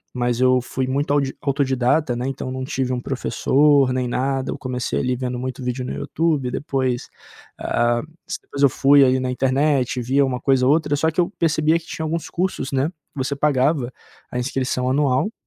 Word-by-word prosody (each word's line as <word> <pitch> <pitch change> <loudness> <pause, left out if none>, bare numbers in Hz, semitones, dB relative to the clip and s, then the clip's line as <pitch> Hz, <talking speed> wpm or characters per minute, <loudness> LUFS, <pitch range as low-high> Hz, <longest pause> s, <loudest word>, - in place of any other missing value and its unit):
mas 120 -1 0
eu 130 0 +4
fui 130 +1 -3
muito 140 +2 -1
audi 140 -2 +1
autodidata, 135 0 +1
né, 120 +1 -3
então 135 -1 -4
não 130 0 -4
tive 130 -1 -2
um 125 - -2
professor 135 +1 +2
nem 125 -1 -1
nada. 135 +2 -1
Eu - - -4
comecei 125 -1 -2
ali 125 -1 0
vendo 125 0 -3
muito 130 +1 -5
vídeo 125 +1 -2
no 125 - -5
YouTube, 155 -6 -1
depois, 130 -3 -2 0.5
hã, 120 0 +1 0.2
s - - -3
depois 140 - -7
eu 140 - +6
fui 140 +3 +5
aí 130 0 +3
na 130 0 -2
internet, 135 0 +1
vi 135 +4 +2
uma 130 -2 0
coisa 130 -1 +2
ou - - +5
outra, 150 -1 +2
só 160 +3 +1
que 160 - -4
eu 175 - +3
percebia 160 0 +2
que 165 - -18
tinha 160 - -5
alguns 165 +1 -3
cursos, 175 -7 -2
né, 135 +4 0 0.2
você 140 +1 -2
pagava 140 -2 +1 0.4
a - - -3
inscrição 125 0 -1
anual 140 +7 +1
130 Hz, 195 wpm, -21 LUFS, 125-145 Hz, 0.5 s, eu